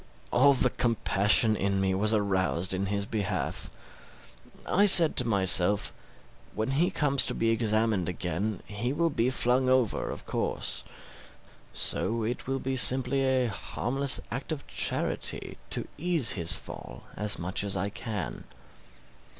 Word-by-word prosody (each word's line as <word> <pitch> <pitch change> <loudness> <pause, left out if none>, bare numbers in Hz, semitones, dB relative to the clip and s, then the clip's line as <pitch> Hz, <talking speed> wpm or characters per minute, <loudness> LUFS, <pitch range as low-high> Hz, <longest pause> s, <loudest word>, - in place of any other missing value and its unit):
All 140 +3 +5
the 130 - +1
compassion 110 -1 +2
in 100 -1 -1
me 95 -1 +1
was 105 +3 +1
aroused 95 -3 0
in 95 +1 -2
his 100 0 -2
behalf. 100 -3 -3 1.0
I 205 +3 +3
said 170 -5 +7
to 125 - +5
myself, 100 -1 +3 0.6
when 110 +4 -2
he 160 +6 +1
comes 140 -2 +3
to - - -2
be 115 0 +1
examined 110 -4 0
again, 90 +4 -3
he 115 +6 -3
will 165 +2 0
be 120 -2 0
flung 130 0 +1
over, 130 -5 +1
of - - -6
course; - - -2 0.9
so 115 0 -2
it 120 +3 -4
will 135 0 -1
be 135 0 -3
simple 130 0 +3
a 130 -2 +1
harmless 130 +5 -1
act 125 +7 -5
of 150 -3 -5
charity - - -2
to - - -3
ease 165 -6 +2
his 85 -4 +1
fall - - -9
as 105 -1 -1
much 90 +3 -3
as 100 -1 -1
I 100 +2 -2
can. 105 -1 -6
115 Hz, 145 wpm, -28 LUFS, 100-130 Hz, 1.0 s, said